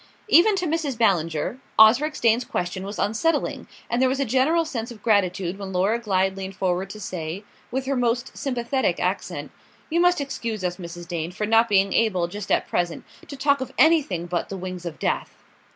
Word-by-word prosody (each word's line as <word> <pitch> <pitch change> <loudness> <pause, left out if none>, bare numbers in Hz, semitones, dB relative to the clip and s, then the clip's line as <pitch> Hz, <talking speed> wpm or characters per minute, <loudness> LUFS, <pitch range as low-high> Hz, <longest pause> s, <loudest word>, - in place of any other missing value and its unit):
Even 415 +1 +6
to 365 -2 -1
Mrs. 310 -6 -1
Ballinger, 175 - +1 0.2
Osric 250 +8 +5
Dane's 235 +1 +3
question 185 -4 -3
was 200 +2 -6
unsettling, 230 +11 0 0.2
and 240 +2 0
there 260 - +4
was 270 +1 -1
a 275 - +1
general 270 +8 +2
sense 240 -7 -4
of 225 -4 -12
gratitude 195 -4 +1
when 195 -1 -6
Laura 195 +5 +1
Glyde 190 -4 0
leaned 195 0 -6
forward 185 0 -1
to 215 - -8
say, 180 -1 -5 0.3
with 265 +2 -3
her 275 +1 0
most 240 -1 -1
sympathetic 260 -1 -1
accent: - - -2 0.4
"You 335 - +2
must 355 -1 +4
excuse 230 -7 -4
us, 180 0 -2
Mrs. 175 -1 -8
Dane, 170 0 -3
for 210 +3 -3
not 225 +2 +4
being 195 -1 +3
able, 190 -7 +2
just 200 +2 -7
at - - +2
present, 175 -1 -2 0.2
to 280 - -8
talk 280 0 +2
of 260 - -4
anything 290 - +3
but 175 -1 -3
'The 195 - -5
Wings 185 -1 -6
of 160 - -7
Death." - - -2
215 Hz, 195 wpm, -24 LUFS, 185-265 Hz, 0.4 s, Even